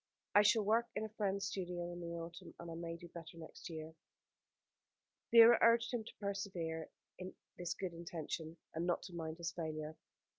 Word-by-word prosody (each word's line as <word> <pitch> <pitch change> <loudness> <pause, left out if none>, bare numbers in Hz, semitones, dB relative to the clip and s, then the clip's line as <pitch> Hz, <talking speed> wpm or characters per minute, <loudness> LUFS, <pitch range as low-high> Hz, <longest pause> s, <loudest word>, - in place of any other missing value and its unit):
I 205 - +9
shall 210 +1 +5
work 225 +3 +3
in 215 - 0
a - - -5
friend's 200 -2 0
studio 175 -3 -3
in 175 - -6
the 170 0 -4
autumn, 170 +1 -7
and 170 0 -6
I - - -4
may 165 0 -4
do 175 - -10
better 165 -1 -9
next 165 +2 -9
year." 160 -1 -6 1.4
Vera 230 0 +10
urged 230 +1 +5
him 235 -2 0
to - - -11
persevere 190 -6 -2 0.3
in 185 0 -6 0.2
this 175 0 -1
good 185 -3 -3
intention, 165 -1 -4 0.2
and 165 +2 -1
not 175 - +1
to 180 - -8
mind 160 -1 -4
his 170 -1 -2
failure. 155 -2 -4
175 Hz, 185 wpm, -38 LUFS, 165-200 Hz, 1.4 s, Vera